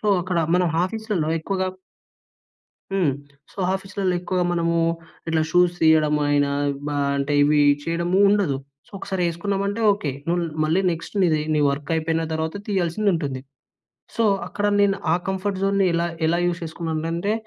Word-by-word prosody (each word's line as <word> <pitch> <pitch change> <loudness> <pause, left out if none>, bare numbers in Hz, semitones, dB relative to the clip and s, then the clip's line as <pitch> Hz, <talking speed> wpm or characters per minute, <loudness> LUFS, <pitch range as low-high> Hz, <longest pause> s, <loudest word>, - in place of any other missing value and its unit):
So, - - -4 0.2
అక్కడ 180 -1 -1 0.2
మనం 180 -1 +3 0.2
ఆఫీస్‌లలో 210 -5 -2
ఎక్కువగా 190 +3 -2 1.3
హ్మ్. 180 -8 +2 0.4
సో, - - -20 0.2
ఆఫీస్‌లల్లో 190 -1 -2
ఎక్కువగా 180 0 -1
మనము 170 -1 0 0.5
ఇట్లా 160 -1 +2
షూస్ 175 +1 +4
తీయడం 155 -2 +4
అయినా 145 -1 +2 0.4
బ - - -1 0.3
అంటే 140 +1 -1
ఇవి 150 +1 +4 0.2
చేయడము 170 +2 0
ఉండదు. 200 -9 +2 0.3
సో, - - -24
ఒకసారి 190 -2 -3
ఏసుకున్నామంటే 200 +5 -2
ఓకే. 180 -8 -3 0.2
నువ్వు 175 +1 +1 0.2
మళ్ళీ 160 +5 +2
నెక్స్ట్ 165 +3 -6
నీది 155 -4 +3
నీ 150 - +2
వర్క్ 145 +1 -4
అయిపోయిన 160 0 0
తర్వాత 160 0 -2
తీయాల్సింది 195 +1 +1
ఉంటుంది. 140 -6 -3 0.8
సో, 230 - +1 0.2
అక్కడ 205 - -3 0.2
నేను 200 -1 +3 0.2
ఆ - - +4
కంఫర్ట్ 190 0 -2
జోన్‌ని 195 -1 +2
ఎలా 170 0 +1 0.2
ఎలా 170 +2 +1
యూస్ 175 -1 -1
చేసుకున్నాను 160 -1 -4
అంటే, 195 +6 -1
170 Hz, 150 wpm, -23 LUFS, 160-195 Hz, 1.3 s, షూస్